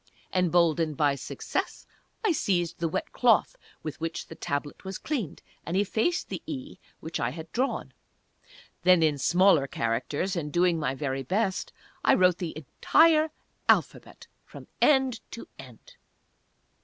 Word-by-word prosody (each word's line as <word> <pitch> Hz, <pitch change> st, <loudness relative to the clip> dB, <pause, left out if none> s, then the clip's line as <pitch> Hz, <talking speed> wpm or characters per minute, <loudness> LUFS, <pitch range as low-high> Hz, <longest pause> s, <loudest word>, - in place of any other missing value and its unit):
Emboldened 170 Hz, -4 st, +2 dB
by 145 Hz, -2 st, +3 dB
success 140 Hz, -, -4 dB, 0.4 s
I 420 Hz, -, +4 dB
seized 180 Hz, -, 0 dB
the 170 Hz, -, 0 dB
wet 305 Hz, -, -3 dB
cloth 235 Hz, -6 st, +3 dB, 0.3 s
with 155 Hz, 0 st, -6 dB
which 165 Hz, 0 st, -3 dB
the -, -, -7 dB
Tablet 145 Hz, -1 st, -4 dB
was 190 Hz, 0 st, -5 dB
cleaned, 240 Hz, -, -4 dB, 0.2 s
and 170 Hz, +3 st, -2 dB
effaced 220 Hz, -, 0 dB
the -, -, -5 dB
"E" 290 Hz, -2 st, -6 dB, 0.2 s
which 160 Hz, -, -4 dB
I 120 Hz, -, 0 dB
had 160 Hz, +4 st, -9 dB
drawn. 230 Hz, -, -2 dB, 0.9 s
Then, 180 Hz, -1 st, +5 dB
in 150 Hz, -3 st, +2 dB
smaller 175 Hz, -2 st, +4 dB
characters, 130 Hz, +11 st, -2 dB
and 150 Hz, -4 st, -3 dB
doing 175 Hz, 0 st, +2 dB
my 135 Hz, -3 st, -1 dB
very 135 Hz, -1 st, -2 dB
best, 190 Hz, -, -1 dB, 0.3 s
I -, -, +5 dB
wrote 180 Hz, -1 st, +3 dB
the 170 Hz, -4 st, -4 dB
entire 310 Hz, -, +3 dB, 0.4 s
Alphabet, -, -, +1 dB, 0.2 s
from -, -, -12 dB, 0.2 s
end 265 Hz, -5 st, +4 dB
to 230 Hz, -, -9 dB
end. -, -, -14 dB
175 Hz, 145 wpm, -27 LUFS, 150-225 Hz, 0.9 s, Then